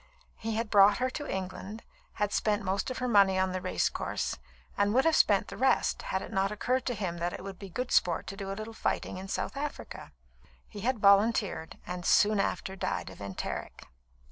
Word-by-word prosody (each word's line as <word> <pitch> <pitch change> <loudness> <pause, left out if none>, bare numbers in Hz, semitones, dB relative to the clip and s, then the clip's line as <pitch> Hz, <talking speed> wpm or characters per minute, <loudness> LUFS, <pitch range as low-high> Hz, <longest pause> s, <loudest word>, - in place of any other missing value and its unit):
He 225 0 -4
had 225 -1 -2
brought 200 0 +7
her 255 +1 0
to 290 +2 -5
England, 190 +3 -5 0.3
had 210 -1 -1
spent 210 -1 +1
most 190 +4 -1
of 255 - -4
her 250 - -1
money 200 -4 +5
on 190 0 +1
the 185 0 -3
race 90 - +1
course, - - -3 0.4
and 205 +2 +1
would 265 - +4
have 325 -1 +4
spent 200 -2 +4
the - - -8
rest, 265 +1 +2
had 190 0 -2
it - - -9
not 195 0 +1
occurred 250 +4 -1
to 245 - 0
him 180 -5 -3
that 175 +1 -1
it - - -7
would 195 -1 -8
be 195 - -8
good 250 +7 -4
sport 170 -2 +2
to 195 - -6
do 195 -1 -5
a 195 - -5
little 220 +1 -6
fighting 220 - -2
in 190 - -7
South 195 - -3
Africa. 285 +1 -6 0.6
He 210 - -9
had 245 +5 0
volunteered, 200 -4 +3
and 180 0 -5
soon 210 +3 +4
after 190 -1 -1
died 195 - -3
of - - -13
enteric. 100 -1 -5
200 Hz, 215 wpm, -30 LUFS, 190-225 Hz, 0.6 s, brought